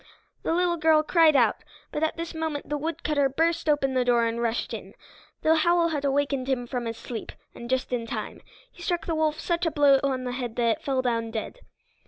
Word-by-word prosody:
The -, -, -2 dB
little 350 Hz, -1 st, +1 dB
girl 315 Hz, -1 st, +4 dB
cried 320 Hz, -1 st, +4 dB
out, 235 Hz, -5 st, +4 dB, 0.3 s
but 300 Hz, -, -3 dB
at 315 Hz, 0 st, 0 dB
this 335 Hz, 0 st, -5 dB
moment 320 Hz, -3 st, -3 dB
the 295 Hz, -, -2 dB
woodcutter 300 Hz, -3 st, 0 dB
burst 325 Hz, +3 st, 0 dB
open 275 Hz, -3 st, +2 dB
the 255 Hz, -1 st, +2 dB
door 240 Hz, -1 st, +3 dB
and 230 Hz, +1 st, -2 dB
rushed 235 Hz, 0 st, -1 dB
in. -, -, -8 dB, 0.5 s
The 320 Hz, +1 st, +4 dB
howl 340 Hz, +1 st, +3 dB
had 295 Hz, -3 st, -2 dB
awakened 275 Hz, -1 st, 0 dB
him 250 Hz, -2 st, 0 dB
from 245 Hz, -1 st, -4 dB
his 230 Hz, 0 st, -4 dB
sleep, 230 Hz, -1 st, -6 dB, 0.2 s
and 235 Hz, -, -9 dB
just 260 Hz, 0 st, -1 dB
in 230 Hz, -2 st, -2 dB
time. -, -, -5 dB, 0.3 s
He -, -, -16 dB
struck 345 Hz, -1 st, -1 dB
the 335 Hz, -, -1 dB
wolf 310 Hz, -1 st, 0 dB
such 340 Hz, 0 st, 0 dB
a -, -, +3 dB
blow 285 Hz, -3 st, +5 dB
on 265 Hz, -2 st, 0 dB
the 250 Hz, -, -3 dB
head 245 Hz, -2 st, -4 dB
that 230 Hz, -2 st, +1 dB
it -, -, -26 dB
fell 265 Hz, -2 st, 0 dB
down 230 Hz, -2 st, 0 dB
dead. 225 Hz, -, -5 dB
280 Hz, 225 wpm, -26 LUFS, 245-320 Hz, 0.5 s, blow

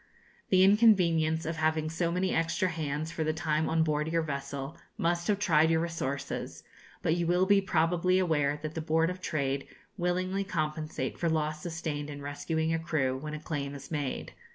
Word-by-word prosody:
The 185 Hz, -1 st, +5 dB
inconvenience 180 Hz, -7 st, +4 dB
of 165 Hz, +1 st, -3 dB
having 155 Hz, 0 st, +1 dB
so 170 Hz, +1 st, 0 dB
many 185 Hz, +2 st, 0 dB
extra 165 Hz, +3 st, +1 dB
hands 155 Hz, -1 st, -3 dB
for 160 Hz, -, -2 dB
the 155 Hz, 0 st, 0 dB
time 160 Hz, -1 st, 0 dB
on 160 Hz, 0 st, +3 dB
board 150 Hz, -1 st, 0 dB
your 165 Hz, 0 st, +1 dB
vessel, 140 Hz, 0 st, -4 dB, 0.2 s
must 170 Hz, +1 st, 0 dB
have 205 Hz, -, +2 dB
tried 160 Hz, -5 st, +4 dB
your 165 Hz, 0 st, +3 dB
resources; 140 Hz, -5 st, -3 dB, 0.4 s
but 160 Hz, -, +2 dB
you 170 Hz, -1 st, 0 dB
will 180 Hz, +2 st, +3 dB
be 200 Hz, 0 st, +5 dB
probably 175 Hz, 0 st, +2 dB
aware 150 Hz, -5 st, +1 dB
that 155 Hz, 0 st, -4 dB
the 160 Hz, -, -3 dB
Board 160 Hz, +2 st, +2 dB
of 180 Hz, 0 st, -8 dB
Trade 140 Hz, -4 st, -1 dB, 0.3 s
willingly 185 Hz, +2 st, 0 dB
compensate 155 Hz, -4 st, -3 dB
for 170 Hz, -, +1 dB
loss 155 Hz, -1 st, -1 dB
sustained 160 Hz, -3 st, -4 dB
in 145 Hz, -1 st, -7 dB
rescuing 160 Hz, +3 st, -2 dB
a 165 Hz, -, +1 dB
crew, 155 Hz, -6 st, 0 dB
when 150 Hz, +3 st, -5 dB
a -, -, -5 dB
claim 145 Hz, -3 st, -4 dB
is 140 Hz, +5 st, -10 dB
made. 145 Hz, -4 st, -3 dB
160 Hz, 185 wpm, -30 LUFS, 150-175 Hz, 0.4 s, The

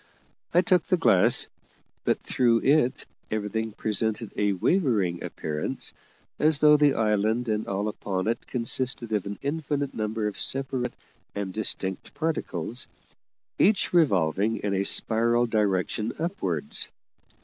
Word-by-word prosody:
I 175 Hz, -, +5 dB
took 180 Hz, -1 st, +3 dB
the 185 Hz, -, +2 dB
glass, 95 Hz, -, +4 dB, 0.6 s
but -, -, +1 dB
through 120 Hz, -2 st, +2 dB
it 140 Hz, -3 st, +2 dB, 0.2 s
everything 110 Hz, +1 st, -2 dB
presented 110 Hz, +1 st, -2 dB
a 105 Hz, -1 st, +1 dB
wavering 100 Hz, -, +1 dB
appearance, 75 Hz, -1 st, -3 dB, 0.5 s
as 155 Hz, -1 st, +4 dB
though 150 Hz, 0 st, +6 dB
the 145 Hz, -2 st, +4 dB
island 110 Hz, +2 st, +1 dB
and 105 Hz, 0 st, -1 dB
all 100 Hz, +2 st, -1 dB
upon 100 Hz, -2 st, -3 dB
it 115 Hz, +1 st, -2 dB
consisted 120 Hz, -1 st, -1 dB
of 105 Hz, -2 st, -1 dB
an 100 Hz, -, -5 dB
infinite 145 Hz, -1 st, -2 dB
number 110 Hz, 0 st, -2 dB
of 105 Hz, -, -3 dB
separate 135 Hz, -2 st, -1 dB, 0.4 s
and 100 Hz, -2 st, -4 dB
distinct 95 Hz, -3 st, -3 dB
particles, 130 Hz, -, -2 dB, 0.7 s
each 200 Hz, -2 st, +3 dB
revolving 105 Hz, -, +2 dB
in 100 Hz, -1 st, 0 dB
a 100 Hz, 0 st, 0 dB
spiral 115 Hz, +3 st, +4 dB
direction 105 Hz, 0 st, 0 dB
upwards. 100 Hz, -, -3 dB
110 Hz, 125 wpm, -26 LUFS, 100-135 Hz, 0.7 s, though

